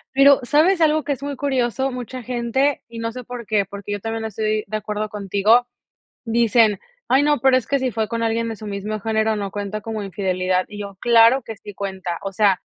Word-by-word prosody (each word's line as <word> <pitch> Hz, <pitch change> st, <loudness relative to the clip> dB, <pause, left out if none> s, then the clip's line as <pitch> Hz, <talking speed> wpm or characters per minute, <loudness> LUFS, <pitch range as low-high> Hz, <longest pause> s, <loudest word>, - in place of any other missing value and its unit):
Pero, 275 Hz, 0 st, +7 dB
¿sabes 330 Hz, +7 st, +3 dB
algo 310 Hz, -1 st, +3 dB
que 295 Hz, -, -3 dB
es 275 Hz, -, -9 dB
muy 285 Hz, 0 st, -3 dB
curioso?, 265 Hz, -1 st, 0 dB
mucha 250 Hz, 0 st, -6 dB
gente, 250 Hz, +3 st, 0 dB
y 230 Hz, -1 st, -9 dB
no 230 Hz, 0 st, -2 dB
sé 250 Hz, +2 st, -8 dB
por 245 Hz, -1 st, -8 dB
qué, 205 Hz, -2 st, +1 dB
porque, 200 Hz, +1 st, -8 dB
yo 205 Hz, -, -2 dB
también 225 Hz, +1 st, -4 dB
estoy 215 Hz, 0 st, -1 dB
de 215 Hz, +2 st, -2 dB
acuerdo 210 Hz, 0 st, -4 dB
contigo, 210 Hz, +3 st, +2 dB, 0.6 s
dicen: 225 Hz, -3 st, +3 dB, 0.3 s
"Ay 270 Hz, +2 st, +4 dB
no, 295 Hz, 0 st, +3 dB
pero, 265 Hz, 0 st, +5 dB
es 255 Hz, -, -1 dB
que 280 Hz, -, +1 dB
si 260 Hz, -1 st, -1 dB
fue 220 Hz, -1 st, -2 dB
con 230 Hz, 0 st, -3 dB
alguien 230 Hz, 0 st, 0 dB
de 225 Hz, -, -5 dB
su 215 Hz, -, -9 dB
mismo 205 Hz, +1 st, -4 dB
género, 220 Hz, +1 st, 0 dB
no 200 Hz, -1 st, -3 dB
cuenta 205 Hz, +1 st, -4 dB
como 215 Hz, 0 st, -5 dB
infidelidad", 185 Hz, -1 st, -1 dB
y 210 Hz, 0 st, -9 dB
yo, 200 Hz, -1 st, -7 dB
claro 235 Hz, +2 st, +5 dB
que 225 Hz, -1 st, -8 dB
sí 205 Hz, 0 st, -11 dB
cuenta, 190 Hz, -3 st, -4 dB
o 195 Hz, -, -4 dB
sea, 200 Hz, -1 st, +3 dB
225 Hz, 220 wpm, -21 LUFS, 205-250 Hz, 0.6 s, Pero